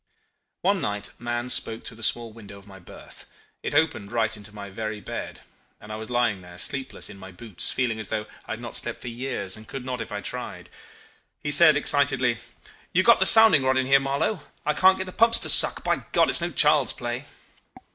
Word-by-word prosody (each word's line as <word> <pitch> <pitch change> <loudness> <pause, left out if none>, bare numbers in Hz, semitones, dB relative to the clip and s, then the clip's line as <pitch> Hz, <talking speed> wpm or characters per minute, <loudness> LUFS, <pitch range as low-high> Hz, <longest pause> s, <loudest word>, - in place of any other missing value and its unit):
"One 195 -1 +1
night 105 0 -4
Mahon 120 +1 -3
spoke 115 -2 -1
through 115 - -10
the - - -14
small 115 0 0
window 105 -3 -12
of 100 - -16
my 95 -1 -14
berth. 90 - -15 0.3
It - - -4
opened 110 -10 0
right 110 -2 0
into 105 0 -11
my 100 -2 -10
very 110 +1 -5
bed, - - -7 0.4
and 105 - -12
I - - -5
was 110 +1 -8
lying 120 -5 0
there 90 0 -14
sleepless, 135 +7 -2
in 100 - -12
my 95 0 -11
boots, 100 0 -4
feeling 120 -4 -1
as 110 - -4
though 110 -1 -3 0.2
I - - -4
had - - -7
not - - -7
slept - - -2
for 125 - -6
years, 120 -6 -3
and 110 0 -12
could 135 -2 -7
not 125 -2 -4
if - - -8
I 105 0 -4
tried. - - -7 0.7
He 150 - -4
said 155 0 +6
excitedly 135 -5 +1 0.5
"'You 185 - +3
got 235 +2 +5
the - - +4
sounding 220 -10 +7
rod 130 0 +1
in 130 - +1
here, 135 +1 +5
Marlow? 140 +9 -1 0.3
I 150 - +1
can't 190 +4 +4
get 190 - -4
the 185 - -8
pumps 230 +4 +3
to - - +1
suck. - - +7
By - - +1 0.2
God! - - +3
it's - - +1
no 170 - -1
child's 150 -6 +2
play. 120 +3 -5
120 Hz, 220 wpm, -24 LUFS, 105-145 Hz, 0.7 s, sounding